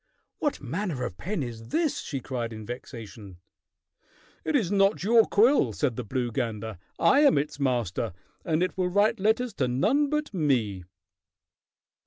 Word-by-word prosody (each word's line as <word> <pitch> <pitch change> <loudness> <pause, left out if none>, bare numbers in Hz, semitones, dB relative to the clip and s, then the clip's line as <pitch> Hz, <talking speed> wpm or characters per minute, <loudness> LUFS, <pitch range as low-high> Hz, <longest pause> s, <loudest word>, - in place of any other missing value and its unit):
"What 295 - -1
manner 150 - -3
of 95 -8 -5
pen 180 - -3
is 115 -2 -7
this?" 320 - 0
she 135 -4 -4
cried 120 -3 -4
in 110 -1 -8
vexation. 115 -5 -9 1.1
"It 310 - -1
is 210 -10 +1
not 195 -1 +3
your 225 +2 +5
quill," 240 +8 +4
said 135 -6 0
the 125 - -4
blue 120 +2 -2
gander. 110 -4 -3 0.2
"I 275 - +5
am 290 - +5
its 145 0 -2
master, 120 -6 -1 0.3
and 160 0 +1
it 185 - -2
will 185 -1 0
write 205 +4 +2
letters 220 +4 +1
to 130 - +1
none 235 - +2
but 300 -4 -2
me." 120 - 0
140 Hz, 160 wpm, -27 LUFS, -, 1.1 s, your